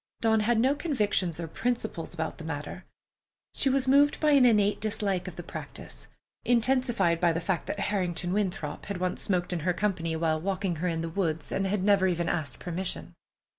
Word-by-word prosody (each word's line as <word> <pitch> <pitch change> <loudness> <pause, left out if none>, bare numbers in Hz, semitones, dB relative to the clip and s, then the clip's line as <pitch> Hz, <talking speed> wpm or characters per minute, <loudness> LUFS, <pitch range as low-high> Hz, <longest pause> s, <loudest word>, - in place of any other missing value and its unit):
Dawn 220 -1 +3
had 225 +2 +2
no 260 +4 +4
convictions 210 - 0
or 165 - -4
principles 220 -3 -2
about 160 -2 -4
the - - -7
matter. 155 +3 -6 0.7
She 275 - +2
was 265 0 +1
moved 285 +2 +4
by 305 -1 +3
an 275 -3 +6
innate 210 -3 +3
dislike 200 -4 -1
of 185 - -7
the 175 - -7
practice, - - -9 0.4
intensified 240 -7 +2
by 175 -1 +4
the 165 - -1
fact 175 +1 -2
that 205 - -3
Harrington 180 -3 -1
Winthrop 180 -7 -2
had 200 -1 -3
once 180 0 -1
smoked 180 -2 +1
in 175 - -1
her 180 +3 0
company 175 -4 -1
while 160 -1 0
walking 190 0 -1
with 160 - -7
her 180 - 0
in 165 -2 -1
the 165 - -3
woods, 165 -3 -2
and 195 - 0
had 195 -1 -1
never 195 -2 +4
even 170 -2 0
asked 155 -4 -2
permission. 180 +1 -4
185 Hz, 200 wpm, -28 LUFS, 170-220 Hz, 0.7 s, an